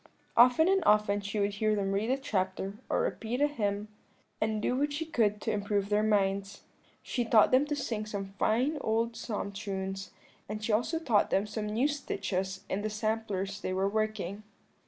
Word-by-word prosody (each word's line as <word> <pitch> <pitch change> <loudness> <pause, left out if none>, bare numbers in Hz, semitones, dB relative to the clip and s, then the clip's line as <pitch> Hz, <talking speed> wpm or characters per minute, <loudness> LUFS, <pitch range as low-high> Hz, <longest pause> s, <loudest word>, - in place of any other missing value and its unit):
"Often 250 +7 +6
and 385 -1 +3
often 210 -4 +3
she 200 +1 -3
would 200 0 +1
hear 215 +1 +1
them 195 -1 -1
read 205 +4 0
a 265 - +2
chapter, 190 -6 -2 0.2
or - - +2
repeat 230 +3 -2
a 290 - +5
hymn, 210 -7 -1 0.5
and 215 0 +1
do 245 - 0
what 290 +2 +1
she 305 +3 -2
could 220 -10 +1
to 225 - -1
improve 205 -1 -1
their 210 0 +3
minds; 200 -1 0 0.4
she 245 - -1
taught 225 -2 +5
them 265 +3 +4
to 295 - -1
sing 220 -6 -3
some 195 -2 -5
fine 260 +8 +2
old 230 +1 0
psalm 205 -4 -4
tunes, 195 -1 -4 0.4
and 210 0 -4
she 225 - 0
also 245 +10 +1
taught 245 -11 +2
them 195 - +2
some 210 0 -4
new 225 +6 +2
stitches 190 -10 -3
in 190 - -2
the 215 - -2
samplers 210 -2 -2
they 185 - -2
were 190 +1 +1
working. 215 -2 -2
210 Hz, 190 wpm, -30 LUFS, 200-235 Hz, 0.5 s, Often